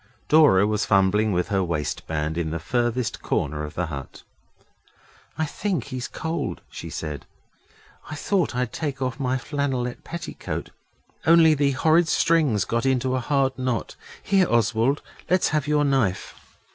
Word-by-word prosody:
Dora 150 -11 +6
was 105 0 0
fumbling 100 +2 +3
with 90 +3 0
her 95 -2 +1
waistband 80 -1 -2
in 85 -2 -1
the 80 - -2
furthest 120 +7 -1
corner 75 +1 -1
of 75 - -7
the 90 - -1
hut. 70 -4 -8 1.1
'I 160 - +1
think 180 - -2
he's 130 -3 -5
cold,' 160 +2 -4
she - - -7
said. 75 -4 -6 0.8
'I 155 - -5
thought 180 -2 0
I'd 125 -1 -1
take 145 -4 -3
off 130 0 -3
my 130 -1 0
flannelette 130 -2 -3
petticoat, 170 -1 -6 0.6
only 165 -1 +7
the 140 -2 +1
horrid 160 +5 +3
strings 155 - +2
got 115 +1 -1
into 130 -1 +1
a - - +1
hard 135 +1 +1
knot. 125 -4 -2 0.3
Here, 190 -2 +3
Oswald, 115 +4 +2 0.3
let's 185 +1 +3
have 150 -2 0
your 150 -1 +2
knife. 130 -10 0
125 Hz, 150 wpm, -24 LUFS, 100-150 Hz, 1.1 s, only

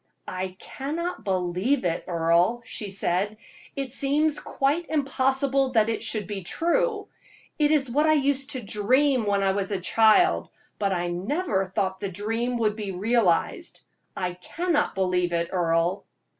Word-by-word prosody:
"I 185 0 -4
cannot 325 - -5
believe 185 +7 0
it, 170 -1 -1
Earle," 170 +7 +2
she 210 -2 -4
said, 195 +2 0 0.4
"it 270 -3 -4
seems 295 +3 +1
quite 295 +5 -1
impossible 270 -2 +1
that 220 -1 +3
it 225 - -2
should 215 -3 -2
be 200 +1 -5
true. 415 - 0 0.5
It 295 -1 +4
is 295 -3 +3
what 300 +5 +2
I 310 - +5
used 280 -2 +1
to 255 -3 -5
dream 250 +4 +2
when 200 -1 +1
a 195 0 0
child, 220 - +3 0.3
but 200 -2 +1
I 175 -1 -1
never 195 - -1
thought 190 0 -2
the 200 - -3
dream 225 +6 -2
would 215 -2 +1
be 210 -3 -4
realized. 195 -2 0 0.4
I 180 -1 -2
cannot 295 - -1
believe 180 -2 0
it, 170 0 0
Earle." 170 +1 +1
215 Hz, 145 wpm, -25 LUFS, 185-275 Hz, 0.5 s, I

